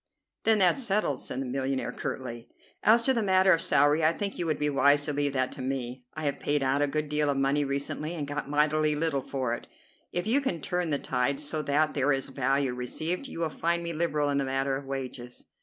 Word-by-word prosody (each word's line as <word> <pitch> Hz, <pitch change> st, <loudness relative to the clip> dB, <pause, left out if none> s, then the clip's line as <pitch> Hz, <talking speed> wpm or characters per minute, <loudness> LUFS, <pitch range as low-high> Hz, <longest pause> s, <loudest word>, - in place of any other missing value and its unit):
"Then 225 Hz, -1 st, +5 dB
that's 190 Hz, +7 st, +3 dB
settled," 195 Hz, -, 0 dB
said 130 Hz, -, -5 dB
the -, -, -3 dB
millionaire 130 Hz, +1 st, -2 dB
curtly. 120 Hz, -2 st, -5 dB, 0.3 s
"As 230 Hz, +2 st, +5 dB
to 265 Hz, -, +4 dB
the 235 Hz, -, +1 dB
matter 190 Hz, -1 st, +4 dB
of 165 Hz, -, +1 dB
salary, 145 Hz, +2 st, +3 dB
I 155 Hz, -, +5 dB
think 200 Hz, +3 st, -4 dB
you 170 Hz, -, -1 dB
would 155 Hz, -, 0 dB
be 150 Hz, -, 0 dB
wise 145 Hz, 0 st, +4 dB
to 145 Hz, -, -2 dB
leave 145 Hz, -1 st, 0 dB
that 130 Hz, -1 st, 0 dB
to -, -, -8 dB
me. 130 Hz, -1 st, -4 dB
I 155 Hz, -, -5 dB
have 145 Hz, -2 st, -1 dB
paid 145 Hz, -1 st, 0 dB
out 135 Hz, +2 st, +1 dB
a 145 Hz, -, +3 dB
good 150 Hz, +1 st, -2 dB
deal 150 Hz, 0 st, +1 dB
of 140 Hz, -, 0 dB
money 135 Hz, +2 st, +2 dB
recently 140 Hz, +4 st, -3 dB
and 150 Hz, -4 st, -4 dB
got 145 Hz, 0 st, -4 dB
mighty 150 Hz, +1 st, +2 dB
little 150 Hz, -3 st, 0 dB
for 130 Hz, -3 st, -2 dB
it. 120 Hz, -, -6 dB, 0.4 s
If 175 Hz, +1 st, -1 dB
you 250 Hz, +6 st, +3 dB
can 190 Hz, -12 st, -2 dB
turn 180 Hz, +1 st, -2 dB
the 145 Hz, -, +1 dB
tide 135 Hz, +1 st, -1 dB
so 150 Hz, +1 st, -3 dB
that 150 Hz, +1 st, +1 dB
there 140 Hz, 0 st, +2 dB
is 135 Hz, -1 st, -1 dB
value 135 Hz, 0 st, 0 dB
received, 155 Hz, -, -3 dB
you 170 Hz, -, -6 dB
will 165 Hz, -, +1 dB
find 170 Hz, +2 st, -1 dB
me 170 Hz, 0 st, -3 dB
liberal 155 Hz, -3 st, 0 dB
in 140 Hz, -, 0 dB
the -, -, +1 dB
matter 135 Hz, 0 st, 0 dB
of 135 Hz, 0 st, -6 dB
wages." 130 Hz, -2 st, -6 dB
145 Hz, 240 wpm, -28 LUFS, 135-165 Hz, 0.4 s, Then